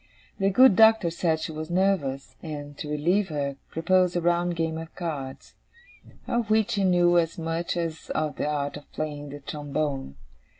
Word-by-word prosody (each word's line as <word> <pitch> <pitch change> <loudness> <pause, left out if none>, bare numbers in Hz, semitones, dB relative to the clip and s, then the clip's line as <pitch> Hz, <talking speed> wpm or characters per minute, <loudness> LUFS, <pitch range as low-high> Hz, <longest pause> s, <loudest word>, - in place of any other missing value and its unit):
The 195 0 +3
good 250 +1 +6
Doctor 220 -5 +6
said 165 -2 0
she 160 - -4
was 155 0 -6
nervous, 175 -8 0
and, 145 -3 -7
to 150 - -5
relieve 175 +7 +1
her, 140 -2 -3
proposed 180 +2 +2
a 175 - +1
round 175 0 +1
game 160 -1 -1
at 165 0 -9
cards; 145 -6 -6 0.7
of 235 -2 -1
which 220 +1 +2
he 200 - +1
knew 175 -1 +4
as 165 -1 -1
much 165 +1 -2
as 165 -2 -4
of 155 -1 -1
the - - -1
art 145 -1 -2
of 145 - -15
playing 145 -1 -4
the 145 +1 -9
trombone. 145 - -3
165 Hz, 175 wpm, -26 LUFS, 150-180 Hz, 0.7 s, good